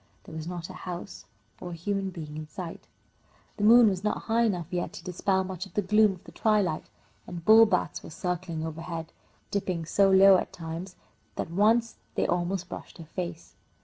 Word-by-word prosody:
There -, -, -12 dB
was 160 Hz, 0 st, -5 dB
not 175 Hz, -1 st, -5 dB
a 185 Hz, -, -9 dB, 0.2 s
house 180 Hz, +2 st, -7 dB, 0.3 s
or 180 Hz, -, -6 dB
a -, -, -6 dB
human 195 Hz, +3 st, -2 dB
being 155 Hz, -4 st, -8 dB
in 155 Hz, 0 st, -6 dB
sight. 170 Hz, +2 st, -8 dB, 0.7 s
The 205 Hz, -, -2 dB
moon 230 Hz, +2 st, +8 dB
was 190 Hz, -2 st, 0 dB
not 210 Hz, -, -1 dB
high 230 Hz, +1 st, +2 dB
enough 180 Hz, -6 st, 0 dB
yet 175 Hz, -1 st, -2 dB
to -, -, -9 dB
dispel 190 Hz, +1 st, 0 dB
much 185 Hz, 0 st, -6 dB
of 180 Hz, -, -22 dB
the 205 Hz, -, +1 dB
gloom 210 Hz, +1 st, +4 dB
of 180 Hz, -, -14 dB
the -, -, -13 dB
twilight, 210 Hz, -7 st, +1 dB, 0.4 s
and 170 Hz, -2 st, -7 dB
bullbats 220 Hz, -4 st, +5 dB
were -, -, -10 dB
circling 170 Hz, -1 st, -3 dB
overhead, 165 Hz, 0 st, -6 dB, 0.4 s
dipping 185 Hz, -4 st, -2 dB
so 195 Hz, +4 st, +3 dB
low 190 Hz, 0 st, +8 dB
at -, -, -3 dB
times 170 Hz, +2 st, -7 dB, 0.4 s
that -, -, -4 dB
once 225 Hz, +5 st, +3 dB, 0.2 s
they -, -, +1 dB
almost 175 Hz, +1 st, -1 dB
brushed -, -, -9 dB
her 165 Hz, -, -9 dB
face. 170 Hz, 0 st, -6 dB
180 Hz, 190 wpm, -28 LUFS, 170-200 Hz, 0.7 s, moon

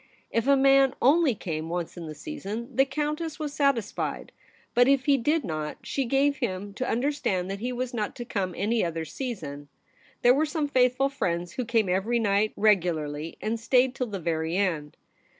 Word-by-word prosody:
If 230 Hz, +2 st, 0 dB
a 280 Hz, 0 st, +6 dB
man 270 Hz, 0 st, +5 dB
only 285 Hz, -1 st, +4 dB
came 160 Hz, -4 st, -4 dB
once 175 Hz, -1 st, -3 dB
in 170 Hz, -2 st, -7 dB
the 155 Hz, -, -7 dB
season, 230 Hz, -, -6 dB
the 270 Hz, -, +5 dB
Countess 300 Hz, +2 st, -3 dB
was 300 Hz, -2 st, -4 dB
satis 275 Hz, -8 st, +1 dB
fied; -, -, -4 dB, 0.4 s
but 245 Hz, +1 st, +5 dB
if 275 Hz, -1 st, +3 dB
he 285 Hz, -, +5 dB
did 295 Hz, +5 st, +1 dB
not, 155 Hz, -5 st, -4 dB
she 275 Hz, -, -2 dB
gave 275 Hz, +3 st, +2 dB
him 200 Hz, -4 st, -3 dB
to 255 Hz, +5 st, -3 dB
understand 235 Hz, -8 st, 0 dB
that 195 Hz, -, -4 dB
he 245 Hz, +4 st, -2 dB
was 250 Hz, 0 st, -3 dB
not 215 Hz, -3 st, -2 dB
to 240 Hz, -, -6 dB
come 185 Hz, -6 st, -2 dB
any 220 Hz, +3 st, +1 dB
other 165 Hz, -1 st, -2 dB
season. 150 Hz, -, -6 dB, 0.6 s
There 245 Hz, -, +7 dB
were 305 Hz, +4 st, +2 dB
some 300 Hz, -1 st, -1 dB
faithful 255 Hz, 0 st, +3 dB
friends 175 Hz, -10 st, -2 dB
who 250 Hz, -, -3 dB
came 225 Hz, -3 st, +2 dB
every 195 Hz, +6 st, +1 dB
night 210 Hz, -1 st, +2 dB
regularly, 165 Hz, -7 st, +1 dB
and 225 Hz, +2 st, -1 dB
stayed 250 Hz, +2 st, +3 dB
till 255 Hz, -1 st, -2 dB
the 200 Hz, -3 st, -5 dB
very 165 Hz, 0 st, -1 dB
end. 165 Hz, -7 st, -1 dB
230 Hz, 190 wpm, -27 LUFS, 180-270 Hz, 0.6 s, There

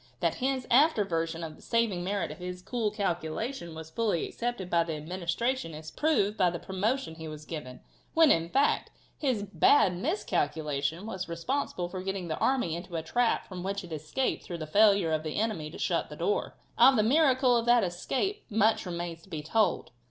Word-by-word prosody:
That -, -, 0 dB
his 260 Hz, -1 st, 0 dB
after 260 Hz, -4 st, +5 dB
version 165 Hz, -2 st, -2 dB
of 155 Hz, -1 st, -6 dB
the -, -, -18 dB
saving 230 Hz, -7 st, 0 dB
merit 200 Hz, +2 st, -1 dB
of -, -, -10 dB
his 180 Hz, 0 st, -6 dB
cool 230 Hz, -1 st, -1 dB
calculation 175 Hz, -, -3 dB
was 160 Hz, 0 st, -9 dB
fully 210 Hz, -4 st, 0 dB
accepted 240 Hz, -6 st, -3 dB
by 170 Hz, -2 st, +3 dB
the 165 Hz, -1 st, -4 dB
Administration 175 Hz, -, -2 dB
is 155 Hz, 0 st, -8 dB
proved 230 Hz, -10 st, +1 dB
by 185 Hz, -2 st, +4 dB
the 170 Hz, -, -4 dB
promotion 200 Hz, +4 st, -2 dB
he 160 Hz, 0 st, -8 dB
was 155 Hz, 0 st, -8 dB
given, 140 Hz, -7 st, -7 dB, 0.3 s
when, 325 Hz, -2 st, +7 dB
in 165 Hz, 0 st, +2 dB
fact, 275 Hz, +8 st, +2 dB, 0.3 s
his 255 Hz, -8 st, 0 dB
bad 200 Hz, -1 st, +4 dB
miscalculation 160 Hz, -, -1 dB
was 190 Hz, -5 st, -5 dB
responsible 175 Hz, +1 st, -2 dB
for 185 Hz, +1 st, -6 dB
getting 190 Hz, -2 st, -4 dB
the 155 Hz, -, -2 dB
army 250 Hz, -12 st, +1 dB
into 175 Hz, 0 st, -7 dB
a 160 Hz, -, -2 dB
trap 240 Hz, +8 st, +1 dB
from 185 Hz, -2 st, -7 dB
which 200 Hz, +2 st, -3 dB
it 170 Hz, -2 st, -8 dB
escaped 155 Hz, -, -2 dB
through 175 Hz, -, -6 dB
the 155 Hz, -, -5 dB
failure 200 Hz, 0 st, +4 dB
of 155 Hz, -1 st, +1 dB
the 155 Hz, -1 st, -5 dB
enemy 210 Hz, -9 st, -1 dB
to 155 Hz, -, -10 dB
shut -, -, 0 dB
the -, -, -8 dB
door. 420 Hz, +4 st, -1 dB, 0.2 s
Of 270 Hz, -, +8 dB
the 215 Hz, -, +3 dB
miracle 260 Hz, -1 st, +4 dB
of 235 Hz, 0 st, 0 dB
that 240 Hz, -1 st, +5 dB
escape 265 Hz, -, -2 dB
much 220 Hz, -2 st, +2 dB
remains 170 Hz, -1 st, -4 dB
to 190 Hz, -, -19 dB
be 155 Hz, -4 st, -5 dB
told. 215 Hz, +7 st, +1 dB
185 Hz, 195 wpm, -29 LUFS, 165-235 Hz, 0.3 s, Of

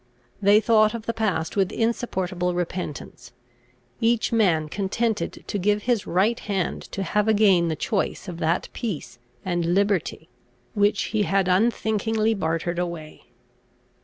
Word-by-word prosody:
They 205 Hz, +1 st, +6 dB
thought 215 Hz, 0 st, +3 dB
of 225 Hz, -1 st, -7 dB
the 230 Hz, -, -1 dB
past 190 Hz, -8 st, -1 dB
with 195 Hz, -2 st, +1 dB
insupportable 185 Hz, -6 st, -1 dB
repentance, 165 Hz, -8 st, -5 dB, 0.7 s
each 230 Hz, 0 st, +1 dB
man 175 Hz, -9 st, +2 dB
contented 205 Hz, +6 st, -2 dB
to 205 Hz, -, -3 dB
give 205 Hz, +2 st, +1 dB
his 240 Hz, -4 st, 0 dB
right 210 Hz, +7 st, +2 dB
hand 195 Hz, -4 st, -2 dB
to 195 Hz, -, -2 dB
have 210 Hz, +4 st, 0 dB
again 200 Hz, -5 st, +4 dB
the 160 Hz, -, -1 dB
choice 195 Hz, +4 st, -2 dB
of 175 Hz, -2 st, -6 dB
that 165 Hz, +2 st, 0 dB
peace 195 Hz, -, -5 dB, 0.3 s
and 175 Hz, -1 st, 0 dB
liberty, 200 Hz, -5 st, 0 dB, 0.5 s
which 205 Hz, 0 st, +2 dB
he 215 Hz, -, +2 dB
had 195 Hz, -2 st, +1 dB
unthinkingly 220 Hz, +2 st, +1 dB
bartered 170 Hz, -2 st, -2 dB
away. 170 Hz, -3 st, -6 dB
195 Hz, 135 wpm, -24 LUFS, 175-215 Hz, 0.7 s, They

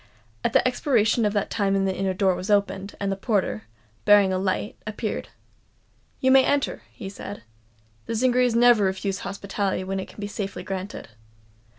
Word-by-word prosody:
At -, -, 0 dB
the -, -, +4 dB
expiration 240 Hz, -3 st, +2 dB
of 205 Hz, -, +1 dB
that 205 Hz, -, -1 dB
time 195 Hz, -2 st, +1 dB
the 190 Hz, -1 st, 0 dB
inner 190 Hz, 0 st, -1 dB
door 190 Hz, -1 st, +3 dB
was 180 Hz, +2 st, -5 dB
opened:; 200 Hz, -1 st, 0 dB
and 200 Hz, -1 st, -1 dB
the -, -, 0 dB
porter, 195 Hz, -, -1 dB, 0.4 s
bearing 205 Hz, -2 st, +5 dB
a 185 Hz, -, 0 dB
light, 190 Hz, +2 st, -1 dB
appeared. 215 Hz, 0 st, -4 dB, 0.9 s
"You 260 Hz, -, +3 dB
may 265 Hz, 0 st, +7 dB
enter," 285 Hz, 0 st, 0 dB
he 215 Hz, -, -8 dB
said. 200 Hz, +1 st, -8 dB, 0.6 s
"The 230 Hz, -, -2 dB
Zingarees 250 Hz, 0 st, +2 dB
never 235 Hz, -3 st, +5 dB
refuse 190 Hz, +1 st, -1 dB
hospitality 200 Hz, -1 st, -3 dB
when 190 Hz, +1 st, -3 dB
it 190 Hz, -, -5 dB
can -, -, -15 dB
be 205 Hz, -, -3 dB
safely 205 Hz, -1 st, -5 dB
granted." 190 Hz, -, -6 dB
200 Hz, 175 wpm, -25 LUFS, 195-225 Hz, 0.9 s, may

